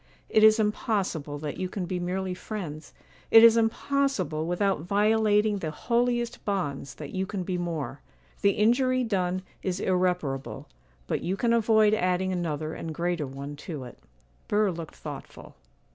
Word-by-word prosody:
It 215 - +4
is 215 0 +8
impossible 195 -8 -1
that 145 0 -5
you 185 -1 -3
can 185 -1 -4
be 180 0 -3
merely 185 +1 -2
friends,—it 180 +3 0
is 230 -1 +9
impossible, 225 - 0
without 185 -1 +1
violating 210 +2 +2
the 160 - -3
holiest 240 +6 -1
bonds, 145 -9 -3
that 150 -2 -8
you 190 0 -1
can 195 -2 -3
be 185 0 -2
more. 155 -6 -4 0.4
The 200 0 +4
injury 255 +4 +3
done 185 -4 -1 0.2
is 185 -1 -2
irreparable, 180 -8 -1 0.4
but - - -2
you 185 +3 -2
can 235 +3 +2
avoid 220 -2 +4
adding 185 -2 +1
another 160 -3 -2
and 160 -1 -6
greater 170 -3 -1
one 140 +2 -7
to 145 -2 -6
it.' 125 - -11 0.5
Burr 210 -1 +2
looked 165 -2 -7
thoughtful. - - -9
185 Hz, 150 wpm, -27 LUFS, 160-215 Hz, 0.5 s, is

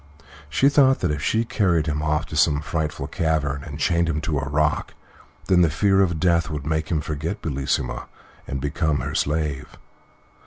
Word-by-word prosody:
She 135 - +3
thought 140 -2 +4
that 90 - +1
if 75 -1 -3
she 110 +7 +1
carried 95 - +1
him 75 -1 -1
off 75 0 0
to - - -8
some 75 -1 +3
frightful 75 0 -3
cavern 70 -4 -1
and 70 -2 -7
chained 85 +1 +1
him 75 -2 -1
to 75 -2 -1
a 70 +1 -4
rock, 75 +1 0 0.5
then 90 -2 +4
the 85 - +4
fear 95 +5 +3
of 85 -4 +1
death 85 -2 +2
would 75 -3 -5
make 80 0 -1
him 80 -3 0
forget 80 +7 -4
Bellissima 70 -4 -2 0.4
and 70 - -3
become 70 +2 -1
her - - -4
slave. 75 -2 -2
80 Hz, 185 wpm, -23 LUFS, 75-85 Hz, 0.5 s, thought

